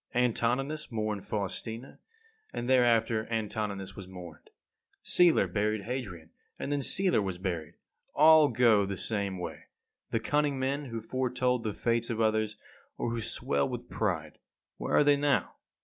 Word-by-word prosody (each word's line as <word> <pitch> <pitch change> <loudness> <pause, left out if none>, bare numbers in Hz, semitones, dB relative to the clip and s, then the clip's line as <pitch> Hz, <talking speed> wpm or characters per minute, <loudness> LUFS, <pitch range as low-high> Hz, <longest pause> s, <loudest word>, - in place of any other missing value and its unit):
Antoninus 125 +5 0
mourned 110 -3 -3
Faustina, 110 +5 -4 0.5
and 120 - -4
thereafter 115 -3 +3
Antoninus 105 -3 -3
was 100 -2 -9
mourned. 90 -4 -11 0.5
Celer 175 -2 +5
buried 105 0 -1
Hadrian, 100 -9 -5 0.3
and 140 - -4
then 145 -1 0
Celer 185 - +2
was 95 -3 -3
buried. 85 -3 -4 0.4
All 155 0 +7
go 115 -6 +4
the 100 -1 -4
same 100 -3 -2
way. 90 - -7 0.4
The 115 - 0
cunning 145 +3 +1
men 135 +2 -1
who 115 -3 -5
foretold 125 -1 0
the 105 -2 -3
fates 115 0 0
of 115 -2 -2
others, 110 -1 +1 0.4
or 120 - -2
who 115 -1 -2
swelled 70 -9 -1
with - - -7
pride - - -2 0.4
where - - -1
are - - +6
they 145 0 +4
now? 140 -2 +1
115 Hz, 150 wpm, -30 LUFS, 100-130 Hz, 0.5 s, All